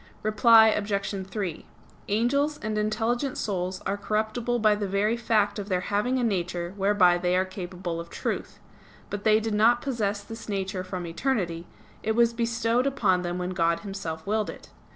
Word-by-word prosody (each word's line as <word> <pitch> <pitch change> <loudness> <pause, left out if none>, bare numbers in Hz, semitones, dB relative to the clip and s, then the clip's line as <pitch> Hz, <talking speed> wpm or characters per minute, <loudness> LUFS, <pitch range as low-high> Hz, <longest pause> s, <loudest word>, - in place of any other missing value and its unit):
Reply 220 +1 +6
Obj. 200 -2 -2
3: 190 -5 -4 0.4
Angels 280 +8 +1
and 215 0 -2
intelligent 230 +5 -1
souls 185 -2 -3
are 195 - 0
incorruptible 220 +3 -1
by 215 -2 +4
the 205 -1 -2
very 200 +4 +1
fact 220 -3 +1
of 205 0 -6
their 180 -1 +1
having 210 +7 0
a 250 - 0
nature 175 -4 -1
whereby 195 -3 +4
they 180 +1 +1
are 185 - +2
capable 180 -2 -5
of 170 0 -7
truth. - - -4 0.5
But 205 0 -5
they 215 0 +5
did 220 0 -2
not 230 +3 +4
possess 210 -7 -2
this 225 +1 -9
nature 190 -2 -2
from 185 -1 -5
eternity; 170 -3 -2 0.3
it 220 - 0
was 235 0 +4
bestowed 230 +2 +1
upon 205 -10 +2
them 175 0 -3
when 180 0 -3
God 170 -2 +1
Himself 195 -6 -6
willed 215 +1 0
it. - - -10
205 Hz, 175 wpm, -26 LUFS, 185-225 Hz, 0.5 s, Reply